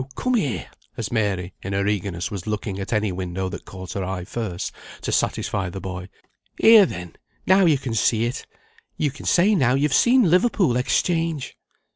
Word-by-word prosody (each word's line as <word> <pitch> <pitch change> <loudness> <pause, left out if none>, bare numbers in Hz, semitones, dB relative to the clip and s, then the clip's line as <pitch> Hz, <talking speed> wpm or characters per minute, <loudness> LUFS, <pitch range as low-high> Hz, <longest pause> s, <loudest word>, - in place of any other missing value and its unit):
come 255 - -1
here," 150 - -1 0.3
as - - -4
Mary, 100 -5 -1
in 100 - -5
her 100 0 0
eagerness, 100 -4 -2
was 100 -1 -6
looking 105 -2 -3
at 95 - -5
any 105 -3 +1
window 90 +1 -3
that - - -8
caught 95 -1 -8
her 100 - -3
eye 90 -1 -4
first, 100 -4 -4 0.3
to - - -4
satisfy 95 -2 0
the 95 - -6
boy. 90 0 -6 0.5
"Here, 220 -4 +8
then, 90 - -8 0.3
now 190 0 +5
you 155 -3 +4
can 130 -3 -5
see 110 +1 +2
it. 120 +2 -4 0.5
You 150 -2 0
can 140 - -9
say, 190 +5 +4
now, 130 - +3
you've 140 0 +1
seen 240 - +4
Liverpool 185 - +3
Exchange." 165 +3 0
110 Hz, 180 wpm, -23 LUFS, 95-155 Hz, 0.5 s, Here